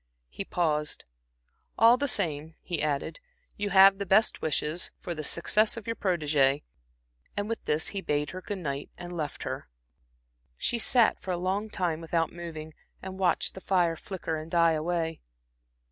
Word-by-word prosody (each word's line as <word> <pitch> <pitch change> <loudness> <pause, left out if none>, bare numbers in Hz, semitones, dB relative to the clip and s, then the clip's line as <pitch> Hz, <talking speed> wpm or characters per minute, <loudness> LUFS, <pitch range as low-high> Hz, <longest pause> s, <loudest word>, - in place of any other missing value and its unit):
He - - -5
paused. 150 -4 0 0.7
"All 230 +2 +7
the 285 +3 -1
same," 160 - -2
he 170 -5 -2
added, 150 - -1 0.4
"you 205 0 -2
have 195 0 +7
the 200 - -2
best 215 +4 +3
wishes 155 +2 -1
for 175 - -4
the 155 -2 -5
success 210 +9 +2
of 220 - -7
your 230 - -2
protégée." 150 -7 +2 0.7
And 205 0 -1
with 230 0 -3
this 150 +1 +1
he 195 - -4
bade 150 -4 -1
her 185 - -7
good 205 +2 -4
night, 140 -5 -4
and 175 0 -7
left 150 -3 -4
her. - - -5 0.9
She 235 - 0
sat 235 0 +3
for - - -8
a 180 - 0
long 190 +4 -1
time 170 -5 -1
without 165 0 0
moving, 160 -2 -7 0.3
and 190 0 -7
watched 185 -2 +2
the 190 - -9
fire 175 -4 +2
flicker 165 -2 -4
and 155 +1 -7
die 170 -1 +4
away. 165 0 -1
175 Hz, 170 wpm, -28 LUFS, 155-195 Hz, 0.9 s, All